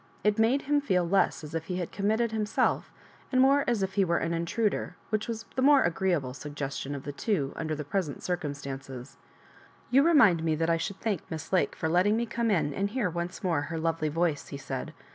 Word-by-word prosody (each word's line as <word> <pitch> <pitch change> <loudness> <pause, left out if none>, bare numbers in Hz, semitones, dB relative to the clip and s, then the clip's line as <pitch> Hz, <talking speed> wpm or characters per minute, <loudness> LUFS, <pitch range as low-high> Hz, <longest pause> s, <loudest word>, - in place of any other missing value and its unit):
It 210 +1 +2
made 240 +5 +3
him 290 +1 +2
feel 180 -11 +1
less 195 -2 +2
as 150 +1 -8
If 165 -1 -3
he 180 - -3
had 180 -2 -3
committed 220 +3 0
himself, 215 -1 0 0.4
and 255 - +2
more 275 +2 +5
as 235 -5 +1
if 190 0 -2
be 200 - +3
were 170 -2 +1
an 165 - -1
intruder, 180 +3 -1 0.2
which 215 -1 0
was 225 -1 -4
the 260 - 0
more 280 0 +6
agreeable 170 -7 0
sug 145 +2 -8
gestion 140 0 -4
of 135 - -7
the 145 - -4
two 145 -2 -1
under 155 -1 -2
the 150 - -4
present 180 -3 -2
circumstan 140 -6 -3
oe& 125 -2 -6 0.5
" - - -27
You 265 +2 +6
remind 255 - +5
me 160 -1 +1
that 165 +2 +1
I 165 - +3
should 185 +4 -4
thank 205 -7 -1
Miss 160 +2 -6
Lake 185 - +2
for 160 - -2
letting 185 +6 +3
me 235 - 0
come 235 0 -1
in 165 -8 +1
and 200 +5 -1
hear 210 -5 -1
once 175 +3 -4
more 170 -6 +1
her 165 +3 -4
lovely 160 -1 0
voice," 165 -1 0
he 140 - -6
said. 140 - -5
180 Hz, 230 wpm, -28 LUFS, 155-220 Hz, 0.5 s, more